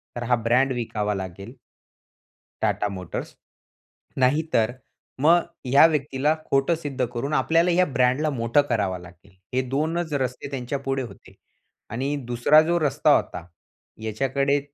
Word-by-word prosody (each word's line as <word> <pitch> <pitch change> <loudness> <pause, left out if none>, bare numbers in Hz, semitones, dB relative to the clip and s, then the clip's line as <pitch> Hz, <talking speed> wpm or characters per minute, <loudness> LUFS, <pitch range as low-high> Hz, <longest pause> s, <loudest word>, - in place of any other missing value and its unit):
तर 120 - -4
हा 125 +1 +2
ब्रँड 125 +4 +3
विकावा 105 -4 -2
लागेल 95 +5 -7 1.1
TATA 105 - +1
मोटर्स 90 -2 -6 0.9
नाहीतर 130 -4 +2 0.5
मग 170 +3 +5 0.2
ह्या 140 +4 +6
व्यक्तीला 150 -1 0
खोटं 135 +5 +2
सिद्ध 145 -5 -3
करून 140 +5 -3
आपल्याला 165 +3 +3
ह्या 180 +1 +4
ब्रँडला 130 +2 +1
मोठं 120 0 +2
करावा 105 -6 0
लागेल. 90 +2 -16 0.2
हे 130 - +2
2च 160 +4 -1
रस्ते 130 -1 -2
त्यांच्या 135 +1 -3
पुढे 135 0 -2
होते 120 - -12 0.6
आणि 135 +5 -2 0.2
दुसरा 120 +6 +5
जो 170 +2 +1
रस्ता 145 -3 +3
होता 85 - -3 0.6
याच्याकडे 135 +5 0
135 Hz, 130 wpm, -24 LUFS, 120-150 Hz, 1.1 s, ह्या